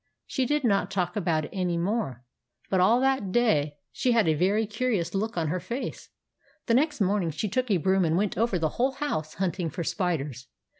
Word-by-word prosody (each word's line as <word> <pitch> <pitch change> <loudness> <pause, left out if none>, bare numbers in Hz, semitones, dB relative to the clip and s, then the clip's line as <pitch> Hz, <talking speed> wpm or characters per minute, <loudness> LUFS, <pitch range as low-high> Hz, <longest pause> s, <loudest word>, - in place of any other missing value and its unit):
She 260 -2 -1
did 295 +1 +1
not 200 -5 +2
talk 180 -3 -1
about 170 -6 0
it - - -10
any 180 -3 -1
more; 170 - -2 0.5
but 190 - +3
all 215 +7 +5
that 265 -8 +1
day 155 -12 +2
she 245 - +1
had 225 -6 +3
a 160 - +4
very 195 +8 +2
curious 215 -4 -1
look 215 +1 -2
on 160 -3 0
her 180 +3 -1
face. 235 +9 -5 0.6
The 230 - +1
next 295 +1 +2
morning 195 -3 +2
she 160 +7 -2
took 250 +5 -1
a 200 - +3
broom 190 +3 +2
and 165 0 +2
went 205 +1 0
over 225 -4 +1
the 160 -2 0
whole 265 +2 +2
house 160 - -3
hunting 180 -2 -1
for 170 +3 -4
spiders. 160 - -2
190 Hz, 205 wpm, -27 LUFS, 170-230 Hz, 0.6 s, all